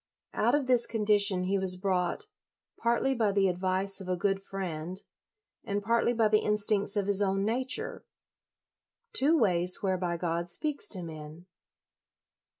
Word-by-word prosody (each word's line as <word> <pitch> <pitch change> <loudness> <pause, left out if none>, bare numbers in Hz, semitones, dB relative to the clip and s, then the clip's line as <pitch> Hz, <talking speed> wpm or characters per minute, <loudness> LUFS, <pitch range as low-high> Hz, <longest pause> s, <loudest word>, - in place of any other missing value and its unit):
Out - - +2
of 290 -2 0
this 250 -2 +3
condition 205 -4 +2
he 195 +2 0
was 185 -1 +4
brought, 185 - -2 0.5
partly 235 +3 +1
by 225 -5 0
the 195 -1 +2
advice 185 +2 0
of 185 - -8
a 180 - -1
good 195 +1 -1
friend, 185 -2 -5 0.6
and 205 0 -3
partly 235 +2 +1
by 225 -2 +2
the 215 0 +3
instincts 210 -1 +1
of 200 - 0
his 200 0 +2
own 195 0 0
nature; 250 +4 -1 1.1
two 305 +5 +3
ways 180 - +2
whereby 180 -3 -1
God 170 0 -3
speaks 290 - -2
to 185 -4 -2
men. 155 +1 -10
195 Hz, 150 wpm, -29 LUFS, 180-215 Hz, 1.1 s, was